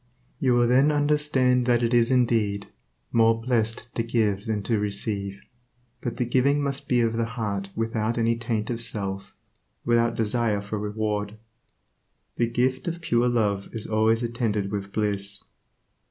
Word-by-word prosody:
You 125 -2 +3
will 120 0 +4
then 135 +5 +4
understand 145 -4 +2
that 120 -1 +3
it 115 +1 +1
is 120 -1 +4
indeed 115 -6 +1 0.5
"more 115 0 +4
blessed 115 -1 -1
to - - -1
give 110 -3 0
than 105 -2 -1
to 110 +1 +1
receive." 100 -1 -2 0.6
But 120 - -4
the 125 - 0
giving 130 +4 +2
must 140 0 -3
be 125 -1 +3
of 115 -1 +1
the 115 - +1
heart 100 -3 -2
without 115 0 -1
any 115 0 +2
taint 115 -1 -2
of 115 -1 -3
self, 100 -3 -4 0.5
without 115 0 +2
desire 110 -1 0
for 105 +1 -4
reward. 105 0 -2 1.0
The 120 -1 +1
gift 130 +3 0
of 170 0 -2
pure 120 -5 +2
love 105 -5 0
is 110 -1 -4
always 110 +2 +2
attended 110 -4 -1
with 100 -1 -4
bliss. 100 -2 -2
115 Hz, 155 wpm, -25 LUFS, 105-120 Hz, 1.0 s, will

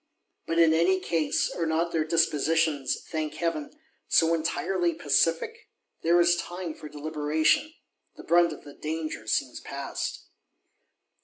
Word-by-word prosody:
—But, 165 - -1
in 165 -1 +6
any 175 +4 +3
case, 165 -4 0
are 165 -2 -2
not 165 +2 0
their 165 -2 +1
dispositions, 160 -3 +1
thank 155 -2 -3
Heaven, 170 - -2 0.4
so 165 0 +4
entirely 170 +1 0
pacific? 165 - 0 0.3
There 170 +1 +4
is 175 0 +5
time 175 -1 -5
for 150 - -10
deliberation. 155 - +1 0.4
The - - -11
brunt 175 0 +4
of - - -9
the 145 - -11
danger 155 +1 -5
seems - - -1
past! - - -5
165 Hz, 135 wpm, -27 LUFS, 155-170 Hz, 0.4 s, in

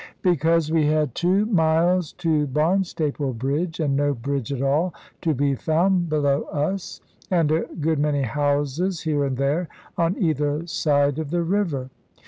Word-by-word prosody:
Because 165 -2 +2
we 160 -2 +3
had 150 -4 +1
two 185 +7 +2
miles 170 -3 +2
to 155 -3 0
Barnstaple 150 -2 0
Bridge, 145 +9 -2
and 145 -4 +1
no 145 0 +1
bridge 135 +1 -3
at 135 -1 -2
all 155 +6 +1 0.3
to 160 -3 +1
be 140 +1 +1
found 175 +5 +1
below 145 -2 +1
us, 175 +6 -3 0.3
and 165 -5 +2
a 160 +1 +1
good 160 0 +1
many 145 -1 +1
houses 145 - 0
here 150 -3 0
and 135 -2 -2
there, 145 +6 0 0.3
on 170 +2 +1
either 150 -1 0
side 145 -3 +1
of 155 -3 -4
the 170 +2 0
river. 165 -8 -1
155 Hz, 155 wpm, -23 LUFS, 140-170 Hz, 0.3 s, we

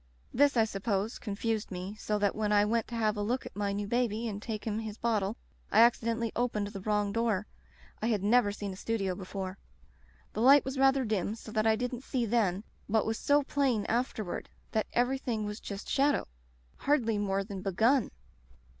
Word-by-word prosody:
This, 285 0 +4
I 225 - +6
sup 195 -3 -6
pose, 210 +1 0
confused 220 +1 -2
me, 185 +1 -5
so 210 0 -2
that 205 -1 +1
when 215 -1 0
I 205 0 +5
went 230 +1 0
to 235 - -6
have 215 -2 +1
a 205 - -3
look 240 +5 -1
at - - -9
my 205 -1 -1
new 205 +1 -2
baby 235 0 0
and 205 -2 -4
take 215 -2 -5
him 220 -1 -1
his 220 -1 -6
bottle 220 -2 0 0.3
I 220 - +6
accidentally 230 -1 +3
opened 230 -4 0
the 200 -2 -7
wrong 210 0 0
door. 220 -2 0 0.6
I 220 - 0
had 210 -4 +1
never 215 0 +4
seen 205 -1 -5
a - - -8
studio 195 -2 -1
before. 190 0 -6 0.7
The - - -2
light 275 +3 +7
was 265 0 -3
rather 270 -1 +4
dim 210 -1 -1
so 225 - -10
that 215 +1 +1
I 220 - +5
didn't 245 +1 -3
see 250 -3 -1
then, 205 -4 +1 0.2
what 220 0 +2
was 220 0 -1
so 290 0 +3
plain 265 -7 +1
afterward, 225 -5 -2 0.2
that 220 - 0
everything 245 -3 0
was 210 +1 -5
just 200 -1 -7
shadow 285 +1 +2 0.3
— - - -31
^hardly 235 -7 +2
more 195 -1 0
than 195 -2 -7
begun. 225 +7 +2
220 Hz, 200 wpm, -30 LUFS, 205-235 Hz, 0.7 s, light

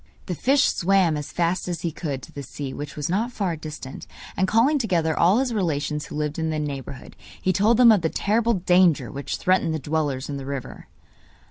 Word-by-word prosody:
The 180 - -3
fish 275 - +3
swam 185 -3 +2
as 150 -1 -5
fast 175 +2 0
as 170 -2 -3
he 170 - -2
could 145 -5 -5
to - - -11
the 140 - -7
sea, 135 0 -6
which 145 0 -7
was 150 -2 -3
not 215 +8 0
far 195 -7 -2
distant, 150 -3 -8 0.3
and 190 - +1
calling 245 +9 +3
together 170 - +1
all 180 +5 +4
his 255 -2 0
relations 150 -6 -1
who - - -8
lived 150 +1 -2
in 160 0 -1
the 155 - -1
neighbourhood, 140 -3 -6 0.2
he 185 - +1
told 215 +5 +3
them 240 -2 +8
of 210 -4 +4
the 160 - 0
terrible 230 +5 +1
danger 180 -3 +3
which 140 0 -4
threatened 185 -3 +1
the - - 0
dwellers 150 -2 -2
in 145 - -4
the 135 - -7
river. 140 -2 -6
165 Hz, 215 wpm, -24 LUFS, 150-195 Hz, 0.3 s, them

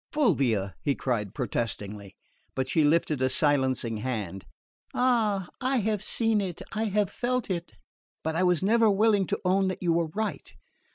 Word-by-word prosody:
"Fulvia!" 120 - +1
he 140 -2 +1
cried 105 -7 -2
protestingly; 105 -6 -4 0.4
but 130 -1 -1
she 155 +3 +2
lifted 150 -2 +2
a 130 - +3
silencing 130 -5 +1
hand. 105 -6 -4 0.5
"Ah, 220 -7 +2
I 260 +1 +1
have 215 -2 0
seen 225 0 +1
it 180 -4 -5
I 220 +1 -1
have 205 -2 +1
felt 250 -3 -1
it 175 -1 -4 0.5
but 160 0 -1
I 165 - +1
was 180 -1 +3
never 225 +2 +4
willing 205 -1 +3
to - - -1
own 190 +1 +3
that 185 0 -3
you 170 -2 +3
were 170 0 +1
right. 200 -2 -4
170 Hz, 165 wpm, -27 LUFS, 130-210 Hz, 0.5 s, never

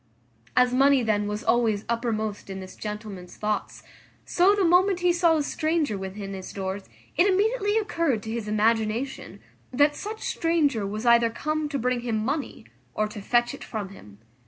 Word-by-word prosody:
As 250 0 +4
money 270 0 +4
then 210 -2 +1
was 210 +1 -4
always 225 -4 +1
uppermost 220 -4 -2
in 190 0 -5
this 185 0 -9
gentleman's 210 -4 -7
thoughts, 210 0 -3 0.4
so 375 +3 +4
the 395 -2 +2
moment 360 +2 +4
he 355 0 +3
saw 340 -2 +3
a 300 - 0
stranger 310 -5 0
within 195 +1 -6
his 190 -1 -7
doors 190 0 -5 0.3
it 350 +4 +5
immediately 415 +2 +2
occurred 335 - 0
to 220 - -5
his 225 -2 -4
imagination, 220 +4 0 0.3
that 290 +3 +3
such 435 +2 -6
stranger 290 -11 +1
was 215 +3 -5
either 235 -1 +5
come 305 +5 -2
to 285 - -2
bring 250 0 0
him 235 -2 -2
money, 275 +7 -3 0.3
or 215 0 +1
to 210 -1 -8
fetch 240 +3 +1
it - - -9
from 210 -4 -5
him. 105 - -14
235 Hz, 175 wpm, -26 LUFS, 210-310 Hz, 0.4 s, it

